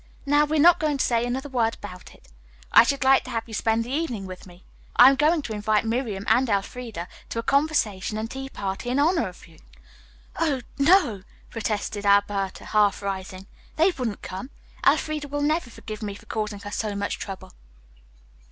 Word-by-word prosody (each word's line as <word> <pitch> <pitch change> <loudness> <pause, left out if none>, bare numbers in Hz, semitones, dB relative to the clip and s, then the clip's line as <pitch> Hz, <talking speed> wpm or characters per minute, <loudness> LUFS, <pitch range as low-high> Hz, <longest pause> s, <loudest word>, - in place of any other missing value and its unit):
Now, 290 +1 +4
we 310 +1 -1
are - - +2
not 345 +3 +6
going 305 -4 0
to - - +1
say 235 -1 +1
another 265 +4 -3
word 235 -4 0
about 180 0 -11
it. - - -22 0.4
I - - +9
should 275 +2 0
like 265 0 +5
to - - -8
have 225 -1 -2
you 225 - -12
spend 225 +1 +1
the 240 - -8
evening 270 -9 -2
with 185 0 -9
me. 175 +1 -17 0.3
I 250 +2 +9
am - - +1
going 305 +2 +2
to 225 - -5
invite 210 +1 +1
Miriam 225 -4 -2
and 245 +3 +3
Elfreda 200 -2 -3 0.2
to - - -5
a 230 - -1
conversation 230 -9 +1
and 220 +1 -4
tea 270 0 -6
party 195 +1 -4
in 250 - 0
honor 310 - +2
of 180 - -12
you." 160 -2 -19 0.8
"Oh, 295 -6 0 0.2
no!" 280 - +4 0.3
protested 210 -2 -3
Alberta, 200 -1 +1
half 210 -1 +2
rising. 190 -1 -5 0.3
"They 335 +4 +4
wouldn't 245 - -4
come. 190 +8 -6 0.4
Elfreda 305 -2 +2
will 290 +1 -2
never 305 -3 0
forgive 215 -1 -9
me 205 -2 -4
for - - -15
causing 210 -2 -4
her 205 - -7
so 210 -1 -2
much 200 0 -3
trouble." 195 -1 -8
230 Hz, 195 wpm, -25 LUFS, 205-280 Hz, 0.8 s, I